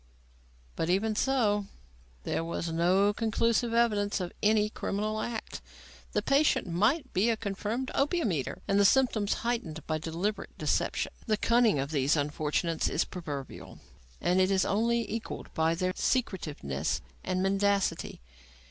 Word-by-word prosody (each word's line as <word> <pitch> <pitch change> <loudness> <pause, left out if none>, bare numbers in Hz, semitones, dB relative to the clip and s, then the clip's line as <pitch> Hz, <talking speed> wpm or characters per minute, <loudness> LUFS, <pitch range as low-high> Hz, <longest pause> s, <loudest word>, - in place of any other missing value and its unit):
But 165 - -1
even 215 +4 +1
so, 210 -5 +1 0.6
there 165 - -1
was 165 0 -3
no 185 +5 +3
conclusive 230 +1 +1
evidence 215 -3 +2
of 180 -2 -4
any 210 0 +3
criminal 215 +1 -2
act. 230 -1 -5 0.5
The - - +1
patient 285 +2 +3
might 220 - +1
be 200 +5 +3
a 225 - +1
confirmed 215 +5 -3
opium 295 - +1
eater, 145 -6 -3
and 200 - +3
the - - +5
symptoms 220 -2 +3
heightened 180 -10 -2
by 155 -1 -1
deliberate 170 +7 -3
deception. - - 0 0.2
The 215 -1 +2
cunning 230 -6 +3
of 140 +2 -2
these 140 0 +2
unfortunates 150 +3 0
is - - +1
proverbial 145 -7 -7 0.4
and 180 +2 +2
is 190 0 +3
only 230 +2 +1
equalled 225 +1 -6
by 160 +1 +2
their 185 +1 -1
secretiveness 155 - -1 0.2
and 185 0 -1
mendacity. 195 - 0
200 Hz, 140 wpm, -29 LUFS, 170-225 Hz, 0.6 s, the